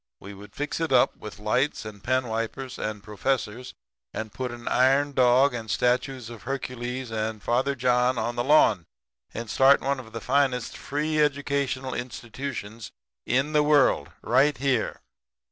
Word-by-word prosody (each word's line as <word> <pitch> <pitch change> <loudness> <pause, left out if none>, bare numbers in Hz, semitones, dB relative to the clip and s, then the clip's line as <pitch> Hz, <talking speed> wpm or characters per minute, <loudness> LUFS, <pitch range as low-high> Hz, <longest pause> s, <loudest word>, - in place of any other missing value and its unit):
We 100 +1 -10
would 100 +1 -13
fix 145 +2 -3
it 165 -2 -1
up 125 -2 +4
with 105 - -10
lights 125 +5 0
and 105 -2 -9
pen 130 0 +1
wipers 115 +4 -4
and 105 -1 -4
professors, 115 +3 -3 0.4
and 110 -1 -5
put 130 -1 -3
an 120 0 -9
iron 135 +3 +3
dog 130 +1 +4
and 115 -2 -6
statues 125 +1 0
of 115 - -10
Hercules 125 -2 -4
and 110 -1 -3
Father 130 +4 +1
John 125 0 +2
on 120 +1 -2
the 120 - 0
lawn, 115 - +4 0.5
and 115 +1 -6
start 135 +5 +5
one 140 0 -1
of 110 -3 -11
the 115 - -5
finest 130 -1 0
free 150 +2 -2
educational 140 -2 0
institutions 120 -2 -6 0.4
in 135 +5 +1
the 150 - +5
world 150 -2 +3
right 135 +4 +3
there. 135 -4 -1
125 Hz, 160 wpm, -26 LUFS, 115-135 Hz, 0.5 s, start